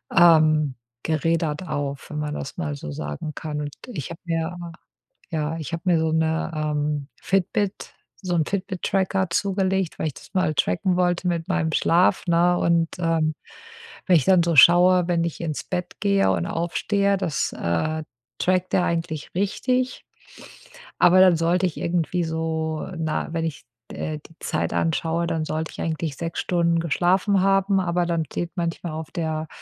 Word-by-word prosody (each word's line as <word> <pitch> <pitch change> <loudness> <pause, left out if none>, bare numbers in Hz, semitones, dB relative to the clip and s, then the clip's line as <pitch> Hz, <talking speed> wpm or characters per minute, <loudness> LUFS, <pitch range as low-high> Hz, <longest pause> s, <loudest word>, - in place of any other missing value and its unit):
ähm, 155 -4 +5 0.3
gerädert 160 +1 0
auf, 140 -2 -4
wenn 150 - -5
man 150 0 -3
das 140 - -6
mal 150 -4 -3
so 140 - -7
sagen 75 - -5
kann. 150 -2 -4
Und 145 0 -4 0.2
ich 155 - -5
habe 165 - -8
mir 165 +1 -2 0.7
ja, 155 0 -2
ich 165 +1 -6
habe 165 - -2
mir 175 -3 +3
so 160 0 0
'ne, 160 +1 0
ähm, 150 -1 -1
Fitbit 195 +1 -1 0.3
so 180 -3 -1
'n 160 -2 +2
Fitbit-Tracker 190 -1 -1
zugelegt, 190 -1 0
weil - - 0
ich 150 - -4
das - - -14
mal 185 -5 +1
tracken 160 - +1
wollte 180 0 +1
mit 170 -2 -1
meinem 175 -4 0
Schlaf, 175 +4 +3
ne, 175 +1 +4
und, 170 -1 +2
ähm, 165 -2 +1 0.7
wenn 180 - +6
ich 150 - +1
dann 185 -3 +5
so 170 -1 +1
schaue, 175 +3 +7
wenn 170 -2 +1
ich 170 -2 -4
ins 155 -3 -3
Bett 180 -1 -4
gehe 200 -1 +3
und - - 0
aufstehe, 200 +4 0
das, 165 -5 -1
äh, 155 - -1 0.4
trackt 185 0 +1
der 180 - +3
eigentlich 165 -2 -3
richtig. 250 +6 -1 0.9
Aber 180 +1 +6
dann 185 -2 +7
sollte 175 +3 +2
ich 175 - -6
irgendwie 175 +1 0
so, 160 -1 -2
na, 160 -1 -2
wenn 165 -1 -1
ich, 150 -6 -5 0.3
äh, 155 -1 -4
die 165 +2 -19
Zeit - - -2
anschaue, 165 +1 0
dann 165 -2 -1
sollte 155 +1 -3
ich - - -8
eigentlich 160 -2 -3
6 165 0 -4
Stunden 170 -1 +1
geschlafen 185 +5 +2
haben, 195 0 +3
aber 175 -1 0
dann 170 -2 -1
steht 170 +2 -4
manchmal 170 -2 -3
auf 160 +1 -6
der 160 -3 -3
170 Hz, 170 wpm, -23 LUFS, 155-180 Hz, 0.9 s, schaue